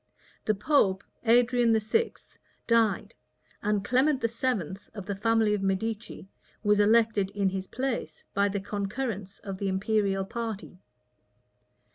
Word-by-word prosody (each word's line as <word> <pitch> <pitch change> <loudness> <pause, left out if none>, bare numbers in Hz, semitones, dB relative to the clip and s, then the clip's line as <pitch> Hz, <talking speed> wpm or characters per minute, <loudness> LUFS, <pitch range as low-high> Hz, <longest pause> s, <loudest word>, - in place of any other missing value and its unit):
The 215 - +2
pope, 195 -4 +2 0.2
Adrian 240 -1 +4
VI., 335 - +1 0.5
died; 230 -3 +2 0.5
and 205 -1 0
Clement 265 +4 +3
VII., 230 - -1 0.2
of 200 -3 -6
the 200 0 -3
family 225 +1 +2
of 205 - -1
Medicis, 205 +3 -2 0.4
was 210 -1 +3
elected 215 -2 +4
in 200 -2 +2
his 190 0 -4
place, 250 - -3
by 200 0 +2
the 200 0 -2
concurrence 205 0 -4
of 195 -2 -6
the 200 - -1
imperial 195 0 +1
party. 220 -4 -5
210 Hz, 125 wpm, -28 LUFS, 195-230 Hz, 0.5 s, Adrian